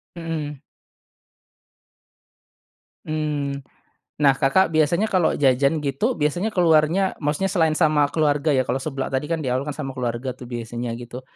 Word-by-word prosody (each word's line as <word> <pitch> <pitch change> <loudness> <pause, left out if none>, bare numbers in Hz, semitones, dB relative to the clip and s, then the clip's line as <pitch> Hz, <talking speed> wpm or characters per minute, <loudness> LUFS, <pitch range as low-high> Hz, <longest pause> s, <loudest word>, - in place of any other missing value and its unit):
Mhm. 155 -4 -5 2.5
Hmm. 150 -3 -2 0.6
Nah 135 -2 +6
Kakak 150 +8 +2
biasanya 170 +7 +3
kalau 180 -4 +3
jajan 140 +2 +2
gitu 145 - 0
biasanya 175 +8 0
keluarnya 165 +1 +3 0.2
maksudnya 150 +7 0
selain 160 -5 +2
sama 155 -3 +3
keluarga 150 -1 +2
ya, 130 - +3
kalau 130 - 0
seblak 135 -3 -4
tadi 130 +3 0
kan 165 - 0
di - - -4
awal 130 +2 0
kan 145 - -4
sama 140 -3 -5
keluarga 125 0 -3
tuh 125 - -9
biasanya 120 0 -5
gitu, 120 +1 -9
150 Hz, 145 wpm, -22 LUFS, 135-160 Hz, 2.5 s, Nah